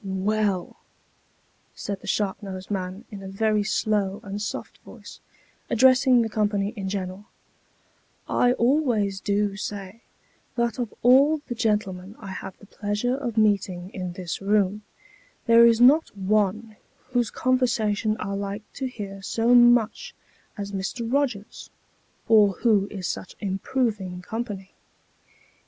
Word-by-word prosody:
" -, -, -28 dB, 0.3 s
Well! 205 Hz, -4 st, -1 dB, 0.5 s
" -, -, -40 dB
said 200 Hz, -1 st, -5 dB
the -, -, -11 dB
sharp 205 Hz, -1 st, -1 dB
nosed 190 Hz, -1 st, -7 dB
man, 190 Hz, +2 st, -4 dB
in 200 Hz, -2 st, -8 dB
a 195 Hz, -, -8 dB
very 210 Hz, +2 st, +1 dB
slow 205 Hz, -2 st, 0 dB
and 200 Hz, +1 st, -5 dB
soft 210 Hz, -, -5 dB
voice, -, -, -13 dB, 0.5 s
addressing 255 Hz, 0 st, +5 dB
the -, -, -1 dB
company 205 Hz, -2 st, 0 dB
in 195 Hz, -3 st, -4 dB
general, 190 Hz, 0 st, -4 dB, 0.6 s
" -, -, -39 dB, 0.2 s
I 245 Hz, -, +4 dB
always 235 Hz, -7 st, +1 dB
do 205 Hz, 0 st, 0 dB
say, 200 Hz, +1 st, -6 dB, 0.5 s
that 235 Hz, -1 st, -1 dB
of 240 Hz, -3 st, -2 dB
all 280 Hz, +5 st, +5 dB
the 245 Hz, -, -4 dB
gentlemen 210 Hz, -4 st, -1 dB
I 200 Hz, -, -9 dB
have 190 Hz, -, -7 dB
the -, -, -16 dB
pleasure 205 Hz, +5 st, -2 dB
of 245 Hz, -5 st, -4 dB
meeting 195 Hz, -4 st, +1 dB
in 180 Hz, -2 st, -5 dB
this 175 Hz, 0 st, -5 dB
room, 205 Hz, 0 st, +1 dB, 0.6 s
there 230 Hz, 0 st, +7 dB
is 230 Hz, -1 st, +4 dB
not 265 Hz, -1 st, +5 dB
one 210 Hz, +2 st, 0 dB, 0.3 s
whose 245 Hz, -3 st, +1 dB
conversation 225 Hz, -4 st, +1 dB
I 200 Hz, -, -3 dB
like 200 Hz, +1 st, -4 dB
to 265 Hz, -, -3 dB
hear 200 Hz, -5 st, -7 dB
so 230 Hz, +4 st, +1 dB
much 240 Hz, -, +4 dB, 0.4 s
as 200 Hz, -1 st, -5 dB
Mr. 225 Hz, +5 st, -4 dB
Rogers's, 245 Hz, -8 st, -2 dB, 0.6 s
or 210 Hz, -3 st, +5 dB
who 210 Hz, -2 st, +2 dB
is 195 Hz, -3 st, -6 dB
such 185 Hz, -, -5 dB
improving 195 Hz, -2 st, -2 dB
company." 205 Hz, -3 st, -5 dB
210 Hz, 140 wpm, -25 LUFS, 195-235 Hz, 0.6 s, there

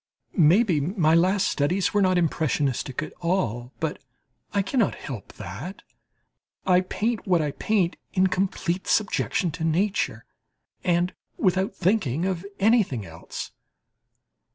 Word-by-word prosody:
Maybe, 175 Hz, +1 st, +5 dB
my 160 Hz, 0 st, +2 dB
last 185 Hz, +4 st, +3 dB
studies 180 Hz, +7 st, +1 dB
are 205 Hz, -, +3 dB
not 185 Hz, -1 st, +3 dB
impressionistic 145 Hz, -4 st, 0 dB
at -, -, -8 dB
all, 130 Hz, -, -1 dB
but 160 Hz, -2 st, -2 dB
that -, -, -35 dB, 0.5 s
I 200 Hz, -, +2 dB
cannot 225 Hz, +1 st, +1 dB
help. 125 Hz, -8 st, -7 dB, 1.3 s
I 180 Hz, -1 st, +5 dB
paint 225 Hz, 0 st, -1 dB
what 180 Hz, -2 st, +4 dB
I 150 Hz, -2 st, 0 dB
paint, 190 Hz, +1 st, 0 dB
in 190 Hz, -1 st, +3 dB
complete 185 Hz, -1 st, -1 dB
subjection 195 Hz, -4 st, +1 dB
to 160 Hz, +2 st, -5 dB
nature, 185 Hz, +6 st, 0 dB, 0.6 s
and 175 Hz, 0 st, +1 dB, 0.2 s
without 190 Hz, +1 st, +1 dB
thinking 180 Hz, -, +1 dB
of 185 Hz, -2 st, -1 dB, 0.2 s
anything 200 Hz, -, +3 dB
else. 85 Hz, 0 st, -8 dB
180 Hz, 125 wpm, -25 LUFS, 155-195 Hz, 1.3 s, Maybe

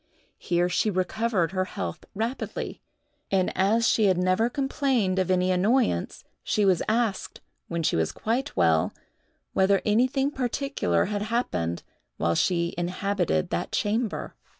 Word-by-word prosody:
Here 175 Hz, 0 st, +1 dB
she 180 Hz, +4 st, +1 dB
recovered 190 Hz, 0 st, 0 dB
her 185 Hz, -1 st, 0 dB
health 90 Hz, -, -5 dB
rapidly; 230 Hz, +5 st, -4 dB, 0.5 s
and 190 Hz, -2 st, +1 dB
as 220 Hz, +4 st, +3 dB
she 220 Hz, -, +3 dB
had 190 Hz, -3 st, +3 dB
never 185 Hz, +6 st, +2 dB
complained 260 Hz, -7 st, 0 dB
of 185 Hz, -, 0 dB
any 185 Hz, 0 st, +2 dB
annoyance, 195 Hz, -, +1 dB, 0.2 s
she 210 Hz, -, +1 dB
was 185 Hz, -4 st, +3 dB
asked, 220 Hz, -3 st, -1 dB, 0.3 s
when 170 Hz, -1 st, -2 dB
she -, -, +1 dB
was 80 Hz, -1 st, +1 dB
quite 235 Hz, -, -2 dB
well, 80 Hz, -3 st, +3 dB, 0.6 s
whether 195 Hz, +1 st, +3 dB
anything 255 Hz, +6 st, +2 dB
particular 250 Hz, -, 0 dB
had 205 Hz, 0 st, -2 dB
happened 90 Hz, -, -2 dB, 0.3 s
while 85 Hz, -, +1 dB
she 170 Hz, -, +1 dB
inhabited 180 Hz, -, -1 dB
that 85 Hz, -, -2 dB
chamber. 220 Hz, +1 st, -1 dB
195 Hz, 135 wpm, -26 LUFS, 175-230 Hz, 0.6 s, as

